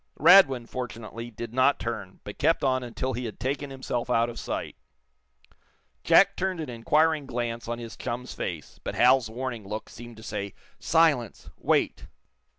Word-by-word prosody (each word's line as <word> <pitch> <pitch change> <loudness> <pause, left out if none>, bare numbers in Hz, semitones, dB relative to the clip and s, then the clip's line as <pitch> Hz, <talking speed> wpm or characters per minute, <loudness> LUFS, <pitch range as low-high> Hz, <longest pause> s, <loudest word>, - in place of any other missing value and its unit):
Radwin, 145 -8 +7
fortunately, 115 -2 -6
did 115 0 -8
not 130 +3 +4
turn, 110 -5 -6
but 105 - -9
kept 165 - +2
on 130 -1 +2
until 125 +2 -3
he 125 +1 -4
had 110 - -7
taken 140 +2 -2
himself 130 -3 -4
out 120 0 +2
of - - -8
sight. - - -4 1.3
Jack 195 0 +5
turned 185 -1 -2
an 155 -5 -4
inquiring 150 +5 +2
glance 120 -2 -3
on 120 0 -3
his 115 -1 -8
chum's 125 0 -5
face. 80 -4 -6
But - - -4
Hal's 125 -2 +4
warning 120 -1 -5
look 105 +2 -5
seemed 120 -1 -11
to 110 - -12
say: 100 -2 -5 0.2
"Silence! 155 -9 +2
Wait!" - - 0
120 Hz, 160 wpm, -27 LUFS, 115-135 Hz, 1.3 s, Radwin